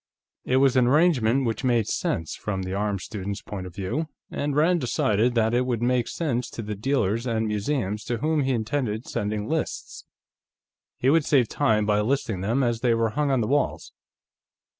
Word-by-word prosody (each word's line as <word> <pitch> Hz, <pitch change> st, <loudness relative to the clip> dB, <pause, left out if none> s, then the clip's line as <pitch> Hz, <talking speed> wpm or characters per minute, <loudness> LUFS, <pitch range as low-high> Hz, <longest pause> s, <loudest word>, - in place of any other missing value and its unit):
It 130 Hz, -, +2 dB
was 135 Hz, -1 st, +4 dB
an 125 Hz, -2 st, +4 dB
arrangement 135 Hz, -4 st, +3 dB
which 115 Hz, +3 st, -2 dB
made 120 Hz, -4 st, +2 dB
sense, 80 Hz, -1 st, -2 dB
from 95 Hz, -3 st, -4 dB
the 95 Hz, 0 st, -4 dB
arms 100 Hz, -1 st, -1 dB
student's 100 Hz, -2 st, -5 dB
point 95 Hz, -3 st, -6 dB
of 90 Hz, -, -12 dB
view, 100 Hz, -, -2 dB, 0.2 s
and 145 Hz, -1 st, -2 dB
Rand 165 Hz, +3 st, +3 dB
decided 120 Hz, -1 st, +1 dB
that 115 Hz, 0 st, +2 dB
it 125 Hz, +1 st, +1 dB
would 120 Hz, -2 st, -1 dB
make 125 Hz, -1 st, +1 dB
sense 125 Hz, -7 st, -2 dB
to 115 Hz, -, -6 dB
the 105 Hz, 0 st, -4 dB
dealers 115 Hz, 0 st, 0 dB
and 110 Hz, -1 st, 0 dB
museums 105 Hz, -1 st, -1 dB
to 120 Hz, -, -2 dB
whom 155 Hz, +4 st, +1 dB
he 135 Hz, 0 st, 0 dB
intended 115 Hz, -1 st, -1 dB
sending 105 Hz, 0 st, -2 dB
lists. 160 Hz, +1 st, -3 dB, 0.9 s
He 130 Hz, -, +2 dB
would 160 Hz, 0 st, +4 dB
save 130 Hz, -6 st, +3 dB
time 110 Hz, -7 st, +2 dB
by 105 Hz, 0 st, +2 dB
listing 115 Hz, -5 st, -1 dB
them 115 Hz, +8 st, +1 dB
as 120 Hz, -2 st, 0 dB
they 120 Hz, -1 st, +2 dB
were 115 Hz, -1 st, +1 dB
hung 145 Hz, +3 st, 0 dB
on 130 Hz, -3 st, +2 dB
the 110 Hz, -, -1 dB
walls. 140 Hz, +3 st, -1 dB
120 Hz, 190 wpm, -25 LUFS, 105-135 Hz, 0.9 s, was